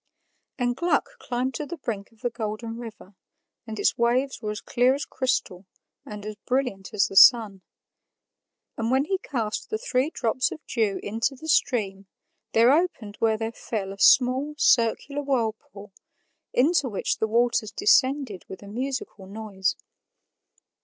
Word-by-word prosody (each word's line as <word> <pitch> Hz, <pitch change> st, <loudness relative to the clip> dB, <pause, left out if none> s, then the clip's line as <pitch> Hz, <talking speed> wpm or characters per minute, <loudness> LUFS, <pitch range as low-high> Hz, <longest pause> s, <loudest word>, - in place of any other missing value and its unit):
And 245 Hz, -2 st, 0 dB
Gluck 445 Hz, -, 0 dB
climbed 255 Hz, -, -2 dB
to 300 Hz, -, -4 dB
the 345 Hz, -, -6 dB
brink 215 Hz, -8 st, -5 dB
of 225 Hz, -, -26 dB
the 245 Hz, -2 st, -1 dB
Golden 225 Hz, 0 st, -5 dB
River, 225 Hz, -4 st, -10 dB, 0.5 s
and 220 Hz, -1 st, -6 dB
its 205 Hz, -, +1 dB
waves 250 Hz, +3 st, +1 dB
were 215 Hz, -, -3 dB
as 210 Hz, -1 st, -4 dB
clear 250 Hz, +2 st, +2 dB
as 285 Hz, -, -4 dB
crystal 205 Hz, -8 st, -2 dB, 0.4 s
and 210 Hz, -1 st, -8 dB
as 215 Hz, -1 st, -6 dB
brilliant 250 Hz, -7 st, -1 dB
as 200 Hz, -, +2 dB
the -, -, -7 dB
sun. 210 Hz, -3 st, +7 dB, 1.2 s
And 225 Hz, 0 st, -1 dB
when 265 Hz, +3 st, +2 dB
he 380 Hz, +3 st, -1 dB
cast 230 Hz, -, -3 dB
the 435 Hz, -, -1 dB
three 285 Hz, -, 0 dB
drops 255 Hz, -4 st, 0 dB
of -, -, -7 dB
dew 215 Hz, -5 st, 0 dB
into 230 Hz, +6 st, -1 dB
the 315 Hz, +5 st, -10 dB
stream, 200 Hz, -10 st, +1 dB, 0.5 s
there 230 Hz, +3 st, +6 dB
opened 280 Hz, -, 0 dB
where 220 Hz, -1 st, +2 dB
they 225 Hz, +1 st, -3 dB
fell 205 Hz, -4 st, -5 dB
a 200 Hz, -, -14 dB
small, 260 Hz, +6 st, +4 dB
circular 275 Hz, +2 st, +2 dB
whirlpool, 225 Hz, -6 st, -3 dB, 0.6 s
into 285 Hz, 0 st, +2 dB
which 205 Hz, -, -2 dB
the 220 Hz, -, +1 dB
waters 230 Hz, -1 st, +1 dB
descended 270 Hz, -, +2 dB
with 190 Hz, -, -9 dB
a -, -, -11 dB
musical 240 Hz, -3 st, -5 dB
noise. 200 Hz, -2 st, -2 dB
235 Hz, 155 wpm, -25 LUFS, 210-265 Hz, 1.2 s, sun